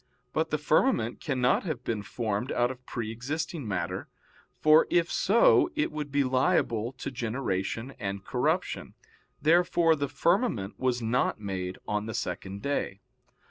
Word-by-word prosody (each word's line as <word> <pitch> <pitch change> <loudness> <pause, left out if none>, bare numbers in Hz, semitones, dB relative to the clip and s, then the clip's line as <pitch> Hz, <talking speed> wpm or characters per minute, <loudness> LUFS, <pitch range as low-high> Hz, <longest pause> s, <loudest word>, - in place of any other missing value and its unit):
But 160 +1 0
the 155 - 0
firmament 150 - +2
cannot 130 -5 +1
have 155 -7 -3
been 110 -3 -2
formed 110 +2 -3
out 120 +1 +2
of 130 0 -11
pre 115 -2 -4
existing 145 +4 -4
matter, 90 -2 -3 0.5
for 155 +1 +6
if 170 -1 +2
so 230 - +4
it 300 - 0
would 150 -2 -5
be 145 0 +3
liable 125 -3 +1
to 130 +2 -6
generation 115 -1 -2
and 100 -3 -4
corruption. - - -1 0.5
Therefore 170 0 +4
the 140 -2 -2
firmament 140 - 0
was 125 -2 0
not 115 0 +1
made 95 -3 -4
on 105 +1 -1
the 110 - -4
second 100 +1 -4
day. 140 -8 -2
125 Hz, 145 wpm, -28 LUFS, 105-155 Hz, 0.5 s, for